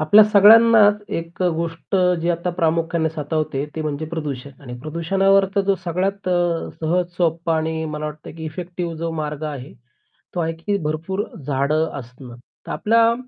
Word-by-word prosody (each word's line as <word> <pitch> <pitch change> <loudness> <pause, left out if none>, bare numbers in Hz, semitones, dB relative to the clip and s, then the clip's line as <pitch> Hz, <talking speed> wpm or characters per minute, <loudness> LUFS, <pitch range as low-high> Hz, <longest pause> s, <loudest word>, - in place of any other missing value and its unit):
आपल्या 180 +8 +7
सगळ्यांनाच 210 0 +6 0.2
एक 170 +2 -6
गोष्ट 170 +1 -1 0.2
जी 170 - -1
आता 175 +1 -1
प्रामुख्याने 165 0 +1
सातवते 150 -2 -2
ती 160 - -4
म्हणजे 155 0 -3
प्रदूषण. 145 -5 -5
आणि 125 -3 -8
प्रदूषणावर 190 +6 +2
तर 200 - +3
जो 200 - +4
सगळ्यात 185 +3 -2
अ, 175 -2 0
सहज, 175 +3 +1
सोप्पं 165 -1 0
आणि 160 0 -1
मला 150 0 -4
वाटतंय 150 0 -7
की 160 0 -8
इफेक्टिव्ह 175 +1 -5
जो 165 +1 -3
मार्ग 150 0 -4
आहे, 145 -3 -6 0.6
तो - - -1
आहे 165 -1 -1
की 185 +5 -2
भरपूर 165 +6 -2 0.2
झाडं 145 +3 +1
असणं. 125 0 -11 0.3
तर - - -4
आपल्या 230 +1 +3
165 Hz, 160 wpm, -21 LUFS, 155-180 Hz, 0.6 s, आपल्या